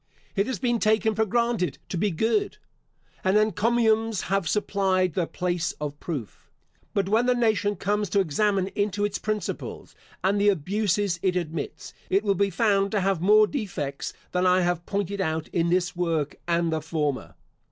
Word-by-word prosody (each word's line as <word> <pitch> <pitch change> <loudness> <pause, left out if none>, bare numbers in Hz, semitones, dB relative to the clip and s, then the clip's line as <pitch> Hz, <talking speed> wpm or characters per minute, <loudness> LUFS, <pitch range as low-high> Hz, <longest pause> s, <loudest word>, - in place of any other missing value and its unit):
It 200 0 +1
has 260 - -2
been 240 -2 0
taken 220 0 +2
for 220 +1 +1
granted 235 -4 0
to - - -3
be 205 +4 +1
good, 225 - 0 0.7
and 190 +2 +3
encomiums 220 +1 +2
have 195 -5 +1
supplied 190 -3 +1
the 175 -3 0
place 175 -2 -2
of 145 -1 -6
proof. 140 - -6 0.5
But 195 -2 +1
when 225 +5 +2
the 250 - +4
nation 215 -4 +1
comes 205 +1 -1
to 200 - +2
examine 195 +2 +1
into 205 0 -1
its 205 -1 -2
principles 215 -1 -4 0.3
and 200 +2 +2
the 205 - +5
abuses 195 +1 0
it 185 -2 +1
admits, 165 -4 -4 0.2
it 195 +2 +2
will 200 -2 +2
be 200 +1 +1
found 200 -2 +2
to 205 - +2
have 190 -3 +1
more 210 +3 +6
defects 180 - -4 0.2
than 180 0 +2
I 180 +1 +4
have 175 -1 -1
pointed 200 0 -2
out 160 -2 -2
in 170 0 0
this 180 +1 +1
work 165 -4 -1
and 170 -1 +1
the 160 - -1
former. 150 -4 -2
195 Hz, 175 wpm, -26 LUFS, 175-210 Hz, 0.7 s, more